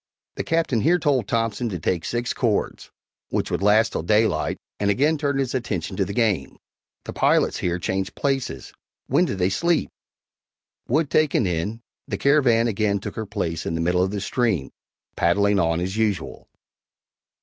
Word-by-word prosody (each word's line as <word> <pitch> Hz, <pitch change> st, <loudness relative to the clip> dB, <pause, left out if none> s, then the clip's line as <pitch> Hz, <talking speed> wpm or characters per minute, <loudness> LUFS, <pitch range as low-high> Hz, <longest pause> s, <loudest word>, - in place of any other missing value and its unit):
The -, -, -4 dB
Captain 165 Hz, -8 st, +1 dB
here 175 Hz, +7 st, +4 dB
told 145 Hz, -7 st, +1 dB
Thompson 115 Hz, +1 st, -1 dB
to 95 Hz, -, -3 dB
take 85 Hz, +1 st, -1 dB
six 120 Hz, +1 st, -2 dB
cords, 115 Hz, -5 st, -1 dB, 0.4 s
which -, -, -2 dB
would -, -, -1 dB
last 110 Hz, +3 st, +4 dB
till -, -, -2 dB
daylight 105 Hz, -2 st, +1 dB, 0.2 s
and 100 Hz, -, +1 dB
again 145 Hz, +10 st, +3 dB
turned 145 Hz, -2 st, -1 dB
his 130 Hz, -2 st, -1 dB
attention 105 Hz, -8 st, -3 dB
to 95 Hz, -, 0 dB
the 95 Hz, -, -5 dB
game. 100 Hz, -, 0 dB, 0.5 s
The -, -, -6 dB
pilots -, -, +2 dB
here 90 Hz, -1 st, -1 dB
changed 95 Hz, +2 st, -3 dB
places. 135 Hz, -, -2 dB, 0.3 s
When -, -, +2 dB
did 100 Hz, -, -3 dB
they 90 Hz, +1 st, +1 dB
sleep? 170 Hz, -, +1 dB, 1.0 s
Wood 150 Hz, +4 st, +1 dB
taken 150 Hz, -7 st, +3 dB
in, 95 Hz, +6 st, -2 dB, 0.3 s
the -, -, -3 dB
Caravan 130 Hz, -5 st, +3 dB
again 105 Hz, -2 st, +1 dB
took 100 Hz, -, -6 dB
her 110 Hz, -1 st, -4 dB
place 85 Hz, -6 st, -3 dB
in 80 Hz, -, -2 dB
the 80 Hz, -, -1 dB
middle 90 Hz, +2 st, +2 dB
of 95 Hz, -, +1 dB
the 100 Hz, 0 st, -4 dB
stream, 100 Hz, -, 0 dB, 0.4 s
paddling 100 Hz, +3 st, +2 dB
on 85 Hz, -1 st, +1 dB
as 95 Hz, +3 st, -3 dB
usual. 110 Hz, -4 st, -2 dB
105 Hz, 170 wpm, -23 LUFS, 95-125 Hz, 1.0 s, here